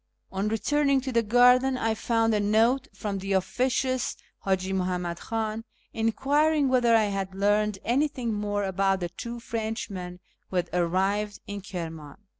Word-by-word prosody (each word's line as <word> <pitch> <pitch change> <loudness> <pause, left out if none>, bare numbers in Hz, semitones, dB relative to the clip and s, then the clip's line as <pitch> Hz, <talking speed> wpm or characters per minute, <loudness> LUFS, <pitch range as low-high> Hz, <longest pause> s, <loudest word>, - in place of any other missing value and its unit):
On 195 +2 -1
returning 275 +6 +2
to 260 0 -4
the 230 -1 +3
garden 250 +3 +4
I 225 -2 0
found 225 0 +1
a 210 - +2
note 225 +6 +2
from 200 -3 -4
the 195 +1 -2
officious 255 +6 0 0.3
Haji 190 0 0
Muhammad 180 -2 -2
Khan, 225 -1 -3 0.3
enquiring 280 +6 +2
whether 245 -3 +4
I 220 - +5
had 195 -2 -3
learned 205 +1 +2
anything 255 -2 0
more 205 0 -1
about 195 0 +1
the 175 - -2
two 235 +6 -7
Frenchmen 215 -6 -4 0.3
who - - -7
had 180 -1 0
arrived 190 +4 0
in 205 0 -6
Kirmiin. 165 -5 -7
210 Hz, 150 wpm, -27 LUFS, 190-240 Hz, 0.3 s, I